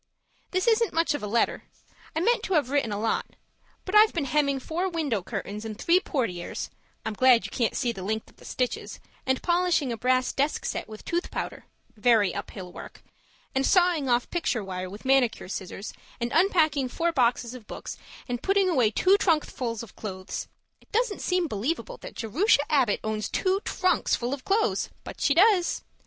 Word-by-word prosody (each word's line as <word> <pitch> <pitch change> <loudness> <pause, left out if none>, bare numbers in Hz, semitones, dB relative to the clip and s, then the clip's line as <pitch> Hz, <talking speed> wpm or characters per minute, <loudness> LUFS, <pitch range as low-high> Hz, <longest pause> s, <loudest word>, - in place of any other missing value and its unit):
This 370 0 0
isn't 460 -5 +3
much 330 -1 +2
of 290 - -3
a 210 - -4
letter; 230 +3 0 0.5
I 320 - +1
meant 475 +6 +3
to 385 - 0
have 280 -4 +2
written 280 -6 +1
a 205 - -2
lot 225 +1 -1 0.5
but 375 - -5
I've 425 +1 +7
been 325 -5 -1
hemming 280 0 +1
four 345 +8 -2
window 300 - -1
curtains 205 +4 -5
and 220 -2 -6
three 340 +8 +4
portieres 220 - -3 0.3
(I'm 220 - -2
glad 250 +1 +5
you - - -6
can't 235 -3 0
see 240 - +1
the 195 - -8
length 220 +3 -2
of - - -21
the - - -16
stitches), 250 -1 -3 0.3
and 260 0 +1
polishing 345 -6 +2
a 230 - -3
brass 255 +1 +1
desk 285 +3 0
set - - -3
with 215 0 -10
tooth 345 +1 -1
powder - - -5 0.3
(very 215 -3 +3
uphill 190 -2 -7
work), - - -11 0.5
and 265 - +1
sawing 345 -4 +3
off 240 0 +2
picture 275 - 0
wire 185 -1 -5
with 205 +6 -11
manicure 265 -6 +2
scissors, 190 +2 -6 0.3
and 235 0 -2
unpacking 310 -8 +3
four 335 +6 0
boxes 240 -3 +1
of 245 -4 -11
books, - - -7 0.3
and 245 -1 -3
putting 390 -1 +2
away 250 -10 +3
two 375 - +4
trunkfuls 255 - 0
of 230 - -13
clothes 190 -3 -6 0.3
(it - - -26
doesn't 455 -2 0
seem 360 -2 +1
believable 290 - -3
that - - -10
Jerusha 285 - +2
Abbott 255 -8 +3
owns 215 -1 -2
two 380 0 +1
trunks 365 -3 +1
full 245 +2 -2
of 275 -2 -6
clothes, 420 +2 +1
but - - -9
she 285 - +3
does!) 375 -1 +4
265 Hz, 190 wpm, -27 LUFS, 225-345 Hz, 0.5 s, I've